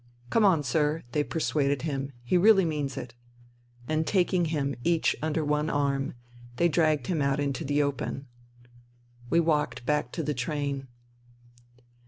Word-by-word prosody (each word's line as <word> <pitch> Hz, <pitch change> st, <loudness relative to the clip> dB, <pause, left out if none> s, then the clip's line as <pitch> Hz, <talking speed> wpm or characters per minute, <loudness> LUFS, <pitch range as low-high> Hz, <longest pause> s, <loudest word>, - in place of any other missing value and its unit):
" 120 Hz, 0 st, -28 dB
Come 225 Hz, -, +3 dB
on, 175 Hz, -7 st, +4 dB
sir," 150 Hz, +4 st, 0 dB
they 150 Hz, +3 st, +1 dB
persuaded 145 Hz, -3 st, 0 dB
him, 140 Hz, -3 st, -3 dB
" 120 Hz, -, -27 dB
he 120 Hz, -, 0 dB
really 195 Hz, +1 st, +6 dB
means 145 Hz, -4 st, -2 dB
it." 120 Hz, 0 st, -6 dB, 0.7 s
And 155 Hz, 0 st, 0 dB
taking 180 Hz, -2 st, +2 dB
him 145 Hz, -3 st, -1 dB
each 170 Hz, +1 st, +2 dB
under 155 Hz, 0 st, -1 dB
one 150 Hz, +1 st, 0 dB
arm, 140 Hz, -2 st, 0 dB, 0.4 s
they 170 Hz, -, +3 dB
dragged 155 Hz, -2 st, +2 dB
him 170 Hz, -5 st, -1 dB
out 140 Hz, 0 st, +1 dB
into 140 Hz, -2 st, -1 dB
the 145 Hz, +2 st, +1 dB
open. 140 Hz, -1 st, -3 dB, 1.0 s
We 170 Hz, -, +4 dB
walked 150 Hz, -6 st, 0 dB
back 150 Hz, -3 st, 0 dB
to 165 Hz, -, -2 dB
the 150 Hz, -, -1 dB
train. 140 Hz, +1 st, -3 dB
150 Hz, 160 wpm, -28 LUFS, 140-160 Hz, 1.0 s, really